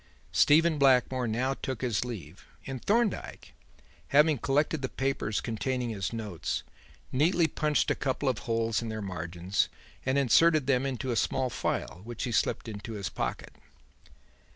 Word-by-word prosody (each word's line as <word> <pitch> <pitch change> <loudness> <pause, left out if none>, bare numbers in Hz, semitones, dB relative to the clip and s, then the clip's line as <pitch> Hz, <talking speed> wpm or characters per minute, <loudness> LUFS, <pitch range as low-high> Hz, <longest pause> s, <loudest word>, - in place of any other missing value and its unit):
Stephen 160 +1 +4
Blackmore 130 -2 +3
now 125 +5 0
took 130 -2 -5
his 120 -5 +1
leave; 95 -9 -8 0.2
and 135 -2 -6
Thorndyke, 225 -1 0 0.5
having 150 -1 +4
collected 145 +4 +1
the 130 - -2
papers 135 -6 -1
containing 125 +1 -2
his 100 -3 -3
notes, 105 -8 -3 0.5
neatly 165 +6 +3
punched 150 -2 +1
a - - +2
couple 135 0 -2
of 125 -4 +1
holes 115 -1 0
in 115 - -4
their 110 0 -4
margins 90 +1 -1 0.3
and 130 +1 +1
inserted 150 +3 +4
them 135 0 +2
into 130 -1 -3
a - - 0
small 130 +2 0
file, 90 - -2
which 120 0 -6
he 125 - -2
slipped 115 - 0
into 110 +1 -6
his 100 -3 -3
pocket. - - -4
125 Hz, 150 wpm, -29 LUFS, 110-140 Hz, 0.5 s, Stephen